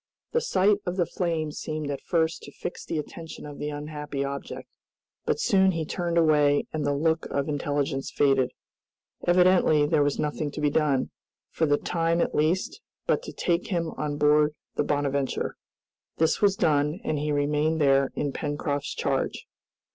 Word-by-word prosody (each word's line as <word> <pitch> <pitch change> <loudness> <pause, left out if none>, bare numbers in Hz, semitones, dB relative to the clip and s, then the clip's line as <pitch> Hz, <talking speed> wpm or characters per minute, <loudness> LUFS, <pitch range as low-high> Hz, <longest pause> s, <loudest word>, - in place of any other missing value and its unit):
The 475 - +2
sight 200 - +3
of 180 +1 -2
the 175 - +3
flame 165 -3 -2
seemed 155 -1 -4
at 140 - -4
first 165 -2 0
to 145 - -10
fix 175 - -6
the 165 - -3
attention 160 +2 -7
of 145 -1 -9
the 150 - -2
unhappy 150 -1 -4
object, 140 0 -6 0.6
but - - 0
soon 190 - +4
he 165 -1 -2
turned 170 +1 -2
away 150 -3 +4
and 155 -1 -1
the 145 0 +1
look 160 +2 +1
of 140 -1 -1
intelligence 145 -1 -1
faded. 135 -3 +2 0.8
Evidently 175 -4 +5
there 150 0 +2
was 145 -1 +1
nothing 150 0 -2
to - - -5
be 150 -1 +2
done, 145 -4 +1 0.4
for 160 - +1
the 145 0 +3
time 165 +1 0
at - - 0
least, 185 - 0 0.2
but - - +1
to - - -8
take 175 0 -1
him 170 -4 -1
on 150 -1 -3
board 150 0 +4 0.2
the - - 0
"Bonadventure." 140 -2 -1 0.6
This 160 0 +2
was 200 -2 +4
done, 150 0 +1
and 150 - -1
he 150 +1 -1
remained 150 +2 +1
there 135 -2 +4
in 145 - -1
Pencroft's 145 -1 -3
charge. - - -1
150 Hz, 170 wpm, -26 LUFS, 145-165 Hz, 0.8 s, Evidently